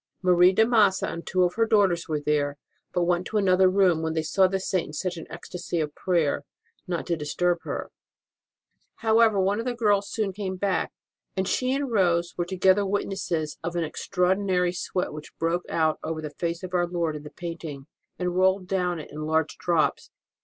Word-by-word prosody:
Marie 180 Hz, 0 st, +6 dB
de 220 Hz, +4 st, +4 dB
Massa 215 Hz, -5 st, +3 dB
and 170 Hz, -, -6 dB
two 185 Hz, -1 st, +2 dB
of 180 Hz, 0 st, +1 dB
her 225 Hz, +2 st, +1 dB
daughters 190 Hz, -7 st, +2 dB
were 155 Hz, -1 st, 0 dB
there, 145 Hz, -1 st, 0 dB, 0.3 s
but 180 Hz, -, +1 dB
went 175 Hz, 0 st, +2 dB
into 215 Hz, -, -1 dB
another 190 Hz, -2 st, +4 dB
room 185 Hz, -4 st, +3 dB
when 160 Hz, 0 st, -1 dB
they 160 Hz, -, 0 dB
saw 190 Hz, +4 st, +3 dB
the 190 Hz, +1 st, -1 dB
Saint 185 Hz, -2 st, -1 dB
in 150 Hz, -, -10 dB
such 180 Hz, +3 st, -2 dB
an 165 Hz, -, -8 dB
ecstasy 175 Hz, -1 st, -5 dB
of 150 Hz, -2 st, -2 dB
prayer, 170 Hz, -5 st, 0 dB, 0.4 s
not 175 Hz, -2 st, -2 dB
to 170 Hz, -, 0 dB
dis 150 Hz, -2 st, -5 dB
turb 175 Hz, -1 st, +2 dB
her. -, -, -4 dB, 1.1 s
However, 220 Hz, -2 st, +5 dB
one 195 Hz, +3 st, +1 dB
of 230 Hz, -, -3 dB
the 250 Hz, -1 st, -1 dB
girls 205 Hz, -4 st, +2 dB
soon 210 Hz, -4 st, -2 dB
came 190 Hz, -1 st, -4 dB
back, 190 Hz, 0 st, -1 dB, 0.5 s
and 190 Hz, 0 st, 0 dB
she 255 Hz, 0 st, 0 dB
and 275 Hz, -2 st, -2 dB
Rose 175 Hz, -5 st, +2 dB
were 175 Hz, -, -1 dB
together 190 Hz, +2 st, +3 dB
witnesses 190 Hz, -6 st, -2 dB
of 170 Hz, +1 st, -3 dB
an 170 Hz, -, +1 dB
extraordinary 180 Hz, +2 st, 0 dB
sweat 180 Hz, -1 st, -3 dB
which 150 Hz, 0 st, -10 dB
broke 170 Hz, +2 st, 0 dB
out 160 Hz, -1 st, +1 dB
over 160 Hz, 0 st, -3 dB
the 155 Hz, -1 st, -5 dB
face 170 Hz, +3 st, -3 dB
of 185 Hz, 0 st, -7 dB
our 175 Hz, -1 st, +2 dB
Lord 170 Hz, -3 st, -1 dB
in 150 Hz, -, -6 dB
the 150 Hz, -, -9 dB
painting, 160 Hz, -3 st, -7 dB, 0.3 s
and 180 Hz, -1 st, -2 dB
rolled 190 Hz, +1 st, +3 dB
down 180 Hz, -2 st, 0 dB
it 155 Hz, -, -9 dB
in 155 Hz, +1 st, -5 dB
large 160 Hz, 0 st, +1 dB
drops. 170 Hz, -3 st, +1 dB
180 Hz, 205 wpm, -26 LUFS, 165-190 Hz, 1.1 s, Marie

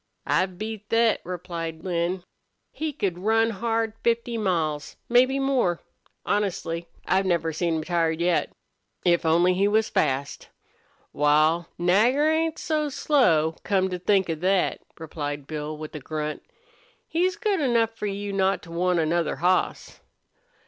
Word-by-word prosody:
"I've 185 Hz, -1 st, 0 dB
beat 215 Hz, 0 st, -6 dB
thet," 230 Hz, -1 st, +3 dB
replied 170 Hz, -2 st, -5 dB
Lin. 175 Hz, 0 st, -1 dB, 0.5 s
"He 315 Hz, 0 st, -3 dB
could 190 Hz, -10 st, -2 dB
run 225 Hz, +3 st, +2 dB
hard 225 Hz, +1 st, -1 dB
fifty 235 Hz, 0 st, 0 dB
miles 165 Hz, -8 st, -1 dB
mebbe 255 Hz, +3 st, +4 dB
more. 260 Hz, -11 st, +1 dB, 0.5 s
Honestly, 175 Hz, -5 st, -1 dB, 0.2 s
I 190 Hz, -, +2 dB
never 170 Hz, -4 st, 0 dB
seen 165 Hz, +1 st, 0 dB
him 160 Hz, -, -2 dB
tired 165 Hz, -1 st, 0 dB
yet. 175 Hz, 0 st, +1 dB, 0.5 s
If 170 Hz, -1 st, +3 dB
only 175 Hz, +3 st, +4 dB
he 195 Hz, +2 st, +2 dB
was 220 Hz, +1 st, +2 dB
fast!" 135 Hz, -1 st, -1 dB, 0.6 s
"Wal, 155 Hz, +3 st, +3 dB
Nagger 220 Hz, -, +3 dB
ain't 320 Hz, 0 st, +1 dB
so 305 Hz, -2 st, -1 dB
slow, 170 Hz, -, +2 dB
come 190 Hz, -2 st, +1 dB
to 180 Hz, -, -3 dB
think 190 Hz, +1 st, +2 dB
of 160 Hz, -1 st, -3 dB
thet," 190 Hz, 0 st, +1 dB, 0.2 s
replied 145 Hz, -3 st, -5 dB
Bill, 155 Hz, 0 st, -5 dB
with 155 Hz, 0 st, -8 dB
a 150 Hz, -, -5 dB
grunt. 150 Hz, +2 st, -4 dB, 0.7 s
"He's 360 Hz, +3 st, +1 dB
good 415 Hz, -4 st, 0 dB
enough 235 Hz, -5 st, +2 dB
for 225 Hz, -2 st, -5 dB
you 200 Hz, 0 st, -4 dB
not 195 Hz, 0 st, +1 dB
to 165 Hz, -, -12 dB
want 180 Hz, +1 st, +1 dB
another 165 Hz, +1 st, +1 dB
hoss." 180 Hz, +2 st, 0 dB
185 Hz, 145 wpm, -25 LUFS, 165-225 Hz, 0.7 s, mebbe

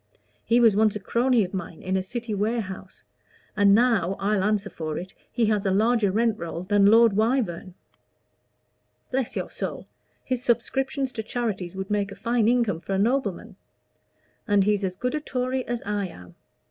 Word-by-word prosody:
He 235 Hz, +1 st, +3 dB
was 225 Hz, -4 st, +5 dB
once 215 Hz, 0 st, +3 dB
a -, -, -3 dB
crony 240 Hz, +2 st, +2 dB
of 185 Hz, -, -6 dB
mine 170 Hz, -3 st, -6 dB
in 185 Hz, +1 st, -1 dB
a 190 Hz, -, +1 dB
city 235 Hz, +4 st, -5 dB
warehouse; 205 Hz, -3 st, -3 dB, 0.5 s
and 200 Hz, -1 st, +5 dB
now, 220 Hz, -6 st, +2 dB
I'll 200 Hz, -1 st, +1 dB
answer 210 Hz, 0 st, 0 dB
for 155 Hz, -2 st, -4 dB
it, 185 Hz, +2 st, -7 dB, 0.2 s
he 235 Hz, -, +1 dB
has 210 Hz, -2 st, +1 dB
a 195 Hz, -, +1 dB
larger 215 Hz, +2 st, +2 dB
rent 225 Hz, +2 st, +1 dB
roll 170 Hz, 0 st, -5 dB
than 200 Hz, +1 st, +3 dB
Lord 225 Hz, 0 st, +6 dB
Wyvern. 215 Hz, -5 st, 0 dB, 1.4 s
Bless 260 Hz, -2 st, -1 dB
your -, -, -4 dB
soul! -, -, -5 dB, 0.4 s
his 255 Hz, -1 st, -2 dB
subscriptions 265 Hz, +3 st, 0 dB
to 225 Hz, -, -4 dB
charities 210 Hz, -6 st, -3 dB
would 190 Hz, +1 st, -5 dB
make 205 Hz, -1 st, 0 dB
a -, -, -8 dB
fine 235 Hz, 0 st, +1 dB
income 230 Hz, -8 st, +2 dB
for 195 Hz, -, -5 dB
a -, -, +1 dB
nobleman. 250 Hz, +7 st, -1 dB, 0.9 s
And 205 Hz, -2 st, +4 dB
he's 205 Hz, 0 st, +1 dB
as 185 Hz, -1 st, -2 dB
good 250 Hz, +7 st, -2 dB
a 305 Hz, -, 0 dB
Tory 255 Hz, -3 st, -2 dB
as 240 Hz, -1 st, -3 dB
I 205 Hz, -1 st, -1 dB
am. 90 Hz, -, -13 dB
210 Hz, 180 wpm, -25 LUFS, 190-240 Hz, 1.4 s, Lord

